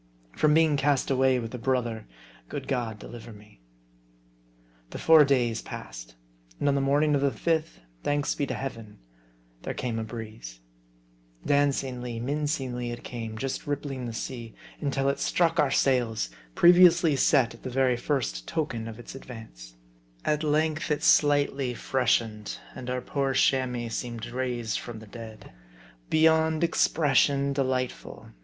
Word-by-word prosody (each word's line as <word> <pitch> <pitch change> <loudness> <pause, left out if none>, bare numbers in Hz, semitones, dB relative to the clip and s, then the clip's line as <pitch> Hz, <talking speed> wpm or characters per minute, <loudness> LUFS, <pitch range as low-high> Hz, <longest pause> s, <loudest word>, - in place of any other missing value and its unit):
From 150 - +2
being 160 -2 +4
cast 140 0 +1
away 130 -1 +3
with 115 -1 -5
a 125 - -5
brother, 120 - -1 0.4
good - - -6
G - - 0
od 115 -4 -2
deliver 115 +2 -10
me! 105 - -16 1.3
The - - -7
four 160 -2 +7
days 125 -5 +1
passed. - - -9 0.4
And - - 0
on 140 - +4
the 140 - +1
morning 145 +2 +2
of 140 - +2
the 140 - +3
fifth, 155 - -1 0.2
thanks 145 0 0
be 145 - -2
to - - -3
Heaven, 115 -6 -7 0.6
there - - -5
came 115 -3 -3
a - - -2
breeze. 110 - -8 0.9
Dancingly, 130 -4 0
mincingly 135 -2 -2
it 120 - -7
came, 115 -2 -6
just 135 +4 -4
rippling 140 -3 -3
the - - -4
sea, 115 0 -6 0.2
until 135 -2 -1
it 140 - 0
struck 165 -1 +1
our 145 - +4
sails, 120 - +1 0.2
previously 175 -3 +6
set 135 -3 +3
at 115 - -15
the - - -5
very 130 0 +2
first 120 - -2
token 120 -8 -3
of 110 -1 -8
its 120 - -10
advance. 110 - -11 0.5
At 150 +1 +1
length 155 +1 0
it 150 - 0
slightly 140 -3 +3
freshened; 115 -5 0 0.2
and 125 - -7
our 125 0 -2
poor 135 0 -1
Chamois 125 -3 +1
seemed 115 0 -4
raised 120 -3 -2
from 120 -2 -8
the 110 - -11
dead. 110 0 -11 0.6
Beyond 160 0 +3
expression 140 -4 +2
delightful 130 -2 -3
130 Hz, 150 wpm, -27 LUFS, 115-145 Hz, 1.3 s, four